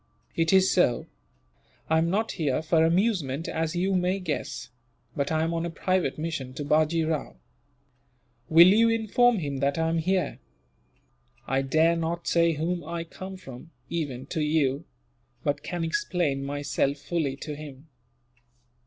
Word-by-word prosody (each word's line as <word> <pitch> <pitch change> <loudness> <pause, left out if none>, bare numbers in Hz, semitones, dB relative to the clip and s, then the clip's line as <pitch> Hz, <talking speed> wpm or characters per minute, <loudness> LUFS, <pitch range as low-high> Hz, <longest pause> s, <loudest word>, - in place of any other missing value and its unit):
"It 165 -1 +2
is 190 0 +5
so. 150 -10 +2 0.8
I 160 0 +3
am 165 +1 +1
not 215 +5 0
here 155 -3 -1
for 160 0 +3
amusement, 165 - +1
as 160 +1 -2
you 190 +3 +1
may 180 +1 +1
guess; 150 -6 -4 0.4
but 140 +1 -1
am 160 +1 +1
on 165 0 -1
a 170 - -2
private 180 -2 0
mission 150 -5 -4
to 145 - -4
Bajee 155 +2 +2
Rao. 155 -2 -2 1.1
Will 170 +3 +8
you 225 +4 +5
inform 225 +1 +3
him 145 -6 -3
that 140 +2 0
I 160 0 +1
am 165 0 +1
here? 185 +3 0 1.1
I 135 +1 +1
dare 160 +5 +3
not 170 +1 -3
say 170 -1 +3
whom 170 +3 -2
I 165 +2 -4
come 185 +3 -9
from, 135 -2 -11 0.2
even 140 -7 -3
to 160 - -1
you; 150 -1 +1 0.6
but 145 -1 -1
can 175 -2 -4
explain 165 - -1
myself 145 0 -1
fully 150 -3 -2
to 150 +2 -6
him." 145 0 -10
165 Hz, 155 wpm, -27 LUFS, 145-175 Hz, 1.1 s, Will